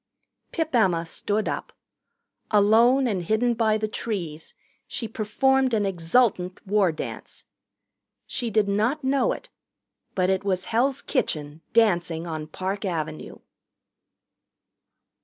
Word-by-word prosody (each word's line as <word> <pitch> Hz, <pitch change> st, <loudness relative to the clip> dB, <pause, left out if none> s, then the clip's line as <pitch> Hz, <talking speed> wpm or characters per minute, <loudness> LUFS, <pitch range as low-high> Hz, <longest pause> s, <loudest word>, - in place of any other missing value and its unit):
Pip 320 Hz, -3 st, -2 dB
Emma 180 Hz, -8 st, +3 dB
stood 205 Hz, +5 st, -2 dB
up. -, -, -3 dB, 0.8 s
Alone 230 Hz, +6 st, +5 dB
and 205 Hz, -7 st, 0 dB
hidden 220 Hz, +7 st, +1 dB
by 220 Hz, -2 st, +2 dB
the 215 Hz, 0 st, -2 dB
trees, 175 Hz, -8 st, -4 dB, 0.3 s
she 230 Hz, -, -4 dB
performed 255 Hz, +4 st, +1 dB
an 210 Hz, -2 st, +1 dB
exultant 185 Hz, +1 st, +1 dB
war 200 Hz, -3 st, +3 dB
dance. 155 Hz, -, -7 dB, 0.8 s
She 240 Hz, -, -3 dB
did 215 Hz, -1 st, +2 dB
not 220 Hz, +9 st, 0 dB
know 265 Hz, 0 st, +2 dB
it. -, -, -6 dB, 0.7 s
But 185 Hz, 0 st, +2 dB
it 190 Hz, +1 st, 0 dB
was 185 Hz, -2 st, -1 dB
Hell's 260 Hz, +4 st, +1 dB
Kitchen 155 Hz, -, -2 dB
dancing 175 Hz, -7 st, +2 dB
on 155 Hz, -2 st, -5 dB
Park 190 Hz, +5 st, -4 dB
Avenue. 160 Hz, -, -4 dB
210 Hz, 120 wpm, -25 LUFS, 180-235 Hz, 0.8 s, Alone